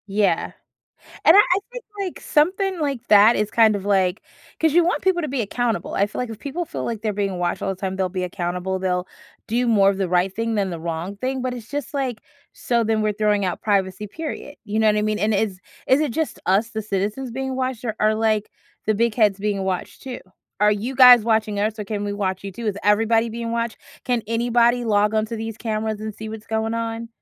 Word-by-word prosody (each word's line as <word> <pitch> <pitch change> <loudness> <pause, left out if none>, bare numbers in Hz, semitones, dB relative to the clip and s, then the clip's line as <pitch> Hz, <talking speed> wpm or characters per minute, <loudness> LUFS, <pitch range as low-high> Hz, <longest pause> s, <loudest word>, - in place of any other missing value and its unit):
Yeah, 200 0 +1 0.7
and - - +8
I - - +8
I 370 -2 +3
think, - - -7 0.2
like, 380 -3 -4
something 370 +4 +1
like 275 -5 -2
that 210 +3 +7
is 210 0 0
kind 220 -2 +4
of, 195 - -6
like 190 -1 +1 0.4
'cause 320 -2 +3
you 345 +2 +5
want 350 - 0
people 370 -2 +2
to 305 - -2
be 270 -1 -2
accountable. 230 +2 -2
I 200 - +2
feel 205 - -6
like 250 -2 -3
if 220 - -8
people 290 +8 -4
feel - - -5
like 225 -3 -4
they're 215 -2 0
being 200 -2 -2
watched 175 -1 -1
all - - -1
the 190 - -4
time, 190 -1 -3
they'll 190 -1 0
be 185 0 -3
accountable, 180 +1 -3
they'll 180 -1 -1 0.4
do 245 +3 0
more 200 -4 +5
of 195 - -4
the 190 -2 0
right 180 +2 +1
thing 230 0 -1
than 200 -3 0
the 170 - -5
wrong 170 +4 -4
thing, 260 +3 -2
but 255 0 -2
it's 230 -3 -9
just 290 -2 -4
like 260 -5 -2 0.3
so 235 -1 0
then 220 0 +1
we're 215 0 +1
throwing 210 -1 +1
out 180 -2 -2
privacy, 200 -1 0
period, 295 +4 -7
you 215 0 -2
know 220 - +3
what 210 -1 +4
I 210 - +1
mean? 215 0 0
And 215 +1 +1
is 195 -2 -1 0.3
is 260 +3 +4
it 300 -6 0
just 320 +2 -2
us- 200 +5 +2
the 220 0 -4
citizens- 210 +5 -2
being 265 +2 -3
watched, 255 -2 -3
or 220 -3 -2
are, 215 0 +3
like, 215 -1 0 0.4
the 215 - +2
big 230 +1 +1
heads 210 -4 +3
being 200 -1 -1
watched 185 -2 -4
too? 255 -2 -6 0.4
"Are 210 0 +5
you 220 +6 -3
guys 250 -3 +8
watching 220 -2 +1
us, 215 +1 -1
or 210 - -4
can 205 0 -3
we 205 - -2
watch 190 -2 -2
you 195 - -5
too? 230 +4 -6
Is 205 -1 -1
everybody 225 +2 +3
being 230 +1 -4
watched? 230 -1 -2 0.3
Can 245 -3 0
anybody 240 +1 +2
log 210 -1 +2
on 215 0 +1
to 230 - -5
these 225 -1 -5
cameras 215 -1 -2
and 215 -1 -5
see 220 +1 -7
what's 220 0 -8
going 220 0 -1
on? 230 0 -3
220 Hz, 240 wpm, -22 LUFS, 200-240 Hz, 0.7 s, and